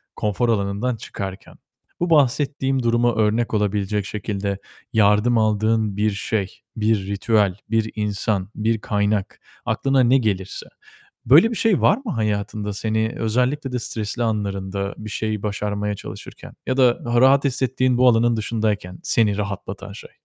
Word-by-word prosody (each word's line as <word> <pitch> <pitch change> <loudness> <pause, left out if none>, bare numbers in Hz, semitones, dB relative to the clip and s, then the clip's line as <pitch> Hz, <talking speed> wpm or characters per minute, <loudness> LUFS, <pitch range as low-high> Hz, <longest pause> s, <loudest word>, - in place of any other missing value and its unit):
konfor 105 +3 0
alanından 105 +3 0
çıkarken 95 -3 -7 0.4
bu 175 0 0
bahsettiğim 135 -2 +2
duruma 120 0 +2
örnek 110 +2 +1
olabilecek 105 -1 0
şekilde 100 -1 -3 0.4
yardım 105 +2 +4
aldığın 110 -1 +1
bir 105 +1 +2
şey, 100 -1 -3 0.2
bir 110 -3 0
ritüel, 100 -1 +1
bir 110 0 0
insan, 105 -2 -1
bir 110 +1 0
kaynak, 105 -1 -1 0.3
aklına 135 0 +1
ne 130 +3 +5
gelirse. 100 -6 -2 0.6
Böyle 160 - +7
bir 230 - -3
şey 210 -2 +2
var 205 - +4
mı 220 - -3
hayatında? 105 -1 -2
Seni 110 +2 -1
özellikle 125 +5 0
de 125 - -1
stresli 115 0 -3
anlarında 100 -3 -2
bir 110 0 -7
şeyi 110 0 -2
başarmaya 105 0 -2
çalışırken - - -9
ya 130 - 0
da 125 -3 +3
daha 120 0 +2
rahat 135 +2 +5
hissettiğin 130 -1 +1
bu 125 - +6
alanın 120 0 +3
dışındayken 105 -4 -2
seni 105 -3 +2
rahatlatan 100 -1 -5
şey. 100 - -11
110 Hz, 140 wpm, -22 LUFS, 100-120 Hz, 0.6 s, Böyle